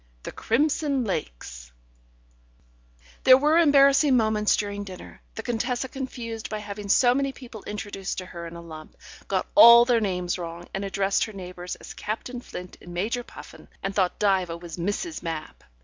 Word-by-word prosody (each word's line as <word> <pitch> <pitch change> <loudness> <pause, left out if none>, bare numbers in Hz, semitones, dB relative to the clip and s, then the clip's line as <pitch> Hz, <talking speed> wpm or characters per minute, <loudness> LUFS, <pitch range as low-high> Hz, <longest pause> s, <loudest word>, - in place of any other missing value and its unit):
The - - -6
crimson 280 +2 0
lakes... - - -5 1.5
There 255 0 +8
were 300 +4 +3
embarrassing 280 -3 +5
moments 215 -2 +2
during 205 -1 -3
dinner; 185 -2 -11
the 225 - -6
Contessa 245 +2 -2
confused 240 -4 -6
by 215 - -3
having 205 -1 -7
so 245 +4 +5
many 275 +1 0
people 240 -5 -11
introduced 205 -2 -5
to 185 - -4
her 170 -2 -8
in 165 - -10
a 170 - -8
lump, 155 -2 -11 0.3
got - - 0
all 235 -5 +9
their 240 -2 +2
names 180 -3 -2
wrong, 170 0 -7
and 195 - -3
addressed 195 0 0
her 220 - -10
neighbours 180 -2 -7
as - - -11
Captain 240 +3 -5
Flint 180 -6 -9
and 175 0 -10
Major 220 +7 -1
Puffin, - - -13 0.2
and 195 - -2
thought 190 -3 +1
that 195 -2 +3
Diva 170 -2 -5
was 170 -2 -9
Mrs. 205 - -3
Mapp. 165 -2 -6
210 Hz, 170 wpm, -25 LUFS, 180-245 Hz, 1.5 s, all